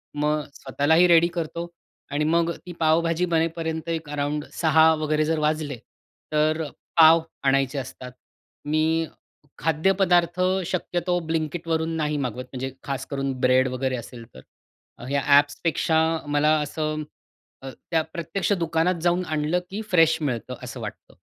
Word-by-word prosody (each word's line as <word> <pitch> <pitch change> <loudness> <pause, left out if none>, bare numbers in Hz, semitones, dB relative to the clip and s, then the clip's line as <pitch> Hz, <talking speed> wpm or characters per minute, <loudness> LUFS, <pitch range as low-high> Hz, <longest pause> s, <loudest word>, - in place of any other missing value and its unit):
मग 150 +1 0
स्वतःलाही 150 +6 +2
रेडी 170 -1 +6
करतो. 170 +1 -3 0.4
आणि 145 +2 0
मग 170 0 +2
ती 180 - -7
पावभाजी 165 +2 +2
बनेपर्यंत 165 -1 -1
एक 160 -2 -3
अराउंड 145 0 -2
6 160 0 +4
वगैरे 155 0 +1
जर 160 0 0
वाजले, 150 -2 -1 0.6
तर 155 +1 +2
अ, 150 - -5 0.3
पाव 160 +1 +8 0.2
आणायचे 135 0 +2
असतात. 130 -1 -8 0.5
मी 155 +1 +1 0.8
खाद्यपदार्थ 175 +2 +2 0.3
शक्यतो 175 -1 -1
ब्लिंकिटवरून 160 0 -1
नाही 150 -1 -1
मागवत. 125 -2 -3
म्हणजे 130 +1 -4
खास 135 -1 -4
करून 135 -1 -2
ब्रेड 130 +1 +4
वगैरे 130 +1 -2
असेल 120 -1 -9
तर, 65 - -11 0.7
या 140 0 +1 0.2
ॲप्सपेक्षा 160 +2 +1 0.3
मला 145 +1 +2
असं 155 +1 -3 0.6
अ, 135 - -6 0.2
त्या 165 -1 +3
प्रत्यक्ष 170 +4 -2
दुकानात 165 +1 +1
जाऊन 175 +1 +2
आणलं, 155 +2 0
की 205 +3 -4
फ्रेश 165 -3 +5
मिळतं 125 -7 -3
असं - - -7
वाटतं. - - -8
155 Hz, 135 wpm, -24 LUFS, 145-165 Hz, 0.8 s, पाव